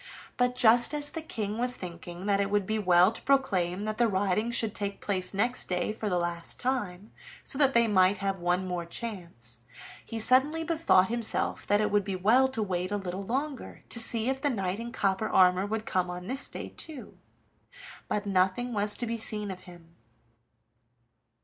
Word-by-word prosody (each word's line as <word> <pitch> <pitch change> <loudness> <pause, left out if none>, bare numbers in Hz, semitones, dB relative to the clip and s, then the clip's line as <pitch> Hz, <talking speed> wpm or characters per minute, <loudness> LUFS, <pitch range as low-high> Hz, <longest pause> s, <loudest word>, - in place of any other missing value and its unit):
But 250 0 +1
just 240 +4 +5
as 290 0 0
the 325 - -5
King 215 -7 -4
was 250 +1 +2
thinking 175 0 -8
that 200 -1 +2
it 200 - -1
would 205 -1 +1
be 215 +2 -1
well 180 0 +5
to 225 - -8
proclaim 200 -9 +1
that 215 +1 -4
the 240 - +4
riding 200 +2 0
should 225 -3 +1
take 200 -1 -3
place 185 -3 -1
next 240 +6 0
day 180 +3 -1
for 215 -1 -4
the 180 - 0
last 175 -1 -3
time, 210 -6 -3 0.3
so 275 - -3
that 275 -3 +3
they 235 0 +5
might 190 -1 +3
have 195 0 -2
one 180 +2 0
more 180 -1 -3
chance, 170 - -7 0.4
he 230 - -7
suddenly 270 +8 +3
bethought 320 - +3
himself 235 -1 -2
that 205 +1 +3
it 210 - 0
would 205 -1 +2
be 195 -1 -3
well 225 +8 +4
to 255 -4 -3
wait 185 -2 -2
a 205 - 0
little 190 -1 -5
longer 265 +7 -4
to 230 - -2
see 225 0 +1
if 265 0 -1
the 290 - +1
knight 195 -5 -2
in 235 +1 -6
copper 195 0 0
armor 185 +1 +4
would 220 +1 -3
come 180 -1 -1
on 180 0 -6
this 265 +6 0
day - - -7
too. 305 -5 -9 0.9
But 210 0 -2
nothing 195 +5 0
was 210 0 +1
to 240 - -3
be 230 0 -3
seen 210 -2 -1
of 185 - -8
him. 170 -1 -16
205 Hz, 195 wpm, -28 LUFS, 185-235 Hz, 0.9 s, just